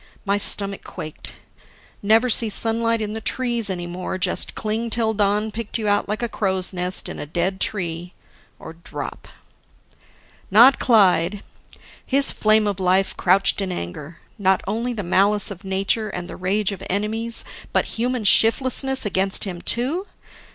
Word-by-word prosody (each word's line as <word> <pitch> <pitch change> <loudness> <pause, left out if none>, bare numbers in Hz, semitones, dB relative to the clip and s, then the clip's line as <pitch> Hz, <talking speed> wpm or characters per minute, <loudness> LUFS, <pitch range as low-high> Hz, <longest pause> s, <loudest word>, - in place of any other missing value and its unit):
My 200 0 +1
stomach 200 -1 0
quaked: 155 -4 -9 0.7
Never 220 +4 +3
see 230 -1 +3
sunlight 230 +2 0
in 210 0 -5
the 220 - -5
trees 240 -3 0
any 175 -2 -4
more, 180 +2 -5
just 185 - 0
cling 220 +2 -2
till 225 -1 0
dawn 210 +1 0
picked 225 0 -4
you 220 -2 -3
out 205 0 0
like 215 +3 -3
a - - 0
crow's 190 -4 -2
nest 180 +1 -2
in - - -7
a - - -6
dead 175 +5 -2
tree; 175 -3 -3 0.4
or 160 - -10
drop... 170 +1 -8 1.2
Not 240 +7 +6
Clyde. 195 -4 +3 0.6
His 275 +1 +4
flame 215 0 +3
of 200 -2 -2
life 190 +1 +1
crouched 190 +2 +2
in 190 -1 -3
anger. 150 - -7 0.2
Not 190 -1 +2
only 230 +4 -2
the 210 -3 -5
malice 200 +4 +1
of 185 -3 -10
nature 195 +3 -1
and 180 -2 -6
the - - -8
rage 195 +3 -1
of 200 - -8
enemies, 220 +4 0 0.3
but - - +1
human 245 0 -2
shiftlessness 260 +5 +4
against 195 -1 +1
him 180 -4 -5
too? 290 - -1
205 Hz, 160 wpm, -21 LUFS, 185-225 Hz, 1.2 s, Not